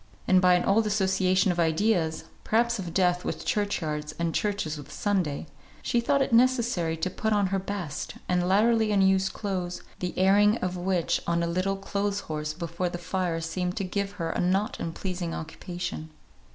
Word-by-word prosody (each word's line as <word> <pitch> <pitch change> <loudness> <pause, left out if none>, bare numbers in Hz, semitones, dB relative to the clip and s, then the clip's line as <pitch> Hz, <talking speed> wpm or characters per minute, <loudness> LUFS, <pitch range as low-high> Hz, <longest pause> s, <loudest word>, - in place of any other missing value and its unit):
And 185 -1 +5
by 180 -1 +6
an 180 - +1
old 215 +2 +3
association 190 -2 +2
of 175 - -3
ideas 165 0 +1 0.2
(perhaps 235 +1 +1
of 180 -3 -5
death 180 0 +2
with - - -4
church 205 -2 0
yards, 150 0 -4
and 170 -1 -1
churches 200 -7 -1
with 145 -2 -10
Sunday) 180 -9 -1 0.4
she 240 - +1
thought 275 +3 +2
it 265 - -3
necessary 235 -9 +3
to 160 +3 -1
put 220 +3 -2
on 205 -1 +3
her 195 - +2
best, 185 -6 -5
and 180 -1 +1
latterly 220 +2 +3
unused 190 -1 +3
clothes, 185 -4 -3 0.2
the 180 -1 -4
airing 205 +4 +5
of 185 -3 -2
which 180 -1 0
on 170 0 +1
a - - 0
little 185 +3 0
clothes 200 +1 -2
horse 150 -1 -4
before 170 +2 -3
the 175 - -5
fire 175 -1 -2
seemed 180 +2 -3
to 200 - -1
give 200 +1 -2
her 165 -5 -3
a - - -3
not 190 +4 0
unpleasing 175 0 -4
occupation. 165 0 -6
185 Hz, 180 wpm, -27 LUFS, 170-205 Hz, 0.4 s, by